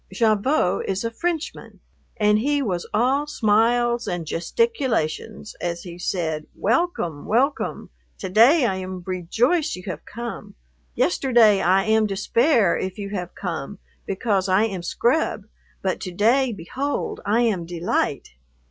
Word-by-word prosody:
Gavotte 215 +1 +1
is 195 +2 -1
a 230 - -2
Frenchman, 330 +6 -4 0.4
and 210 0 +3
he 285 +4 +1
was 180 -7 -3
all 265 +7 +1
smiles 235 -2 +2
and 175 -4 -3
gesticulations 220 - -1
as 170 -1 -3
he 175 -1 -9
said, 160 -4 -2
"Welcome, 210 - -1
welcome! 265 - 0 0.3
To - - -5
day 245 - +5
I 190 -4 0
am 185 -1 -6
rejoice 225 - 0
you 180 - -10
have 185 - -6
come. 230 -3 -7 0.4
Yesterday 235 - +4
I 190 +3 +3
am 220 0 +2
despair 210 - +2
if 190 0 -4
you 200 -1 -5
have 180 -3 -5
come 175 -1 -5 0.3
because 195 -1 0
I 190 +3 +4
am 195 -5 -2
scrub, 235 - 0 0.4
but 190 -1 -1
to 185 - -5
day, 235 +8 +3
behold, 255 +10 -4
I 215 +4 +2
am 195 -8 0
delight." 175 0 -1
210 Hz, 140 wpm, -23 LUFS, 185-240 Hz, 0.4 s, day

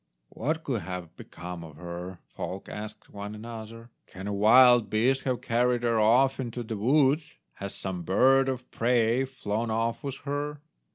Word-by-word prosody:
"What 155 +6 -2
could 120 -6 -2
have 90 -1 -7
become 90 0 -8
of 80 -3 -11
her?" 90 +2 -7
folk 95 +1 -6
asked 105 0 -8
one 105 +1 -6
another; 115 +1 -9 0.2
"can 95 +1 -9
a 105 - -2
wild 120 +3 +6
beast 130 +5 +2
have 130 -2 -1
carried 120 +1 +1
her 115 -2 +2
off 125 +5 +4
into 120 -1 -4
the 110 0 -5
woods? 140 +6 +2 0.2
Has 100 0 -5
some 95 -2 -4
bird 130 +10 +4
of 130 -1 -5
prey 120 +1 +2
flown 115 -3 -3
off 115 +1 -1
with 140 -1 -4
her?" 145 +1 -3
115 Hz, 165 wpm, -28 LUFS, 100-130 Hz, 0.2 s, wild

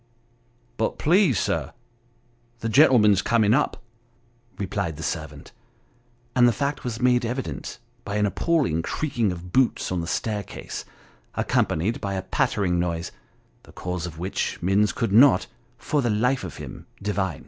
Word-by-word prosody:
" 120 0 -38
But 110 - 0
please, 170 - +3
sir, - - -1 0.9
the 115 - -1
gentleman's 110 - +5
coming 110 -1 +3
up," 140 -2 0 0.7
replied 95 -4 -2
the 80 - -6
servant, 75 -4 -5 0.8
and 120 -1 +6
the - - +5
fact 140 +4 -2
was 120 -2 -4
made 125 -1 +3
evident, 125 +3 -4 0.3
by 100 -2 -4
an 105 0 +2
appalling 125 - +1
creaking 120 - -1
of 90 0 -8
boots 130 -7 +2
on 90 -2 -1
the 85 - -5
staircase 105 +1 -4 0.5
accompanied 95 +9 0
by 100 -2 -2
a 95 - -3
pattering 95 -1 0
noise; 85 -1 -2 0.5
the - - -17
cause 90 -1 -4
of 80 -2 -9
which, 90 +4 -2
Minns 100 +4 +2
could 115 -5 -2
not, 130 +5 +6 0.3
for 145 +3 0
the 120 - 0
life 125 +5 +1
of - - -7
him - - -9
divine. 95 -6 -2
105 Hz, 150 wpm, -24 LUFS, 90-125 Hz, 0.9 s, and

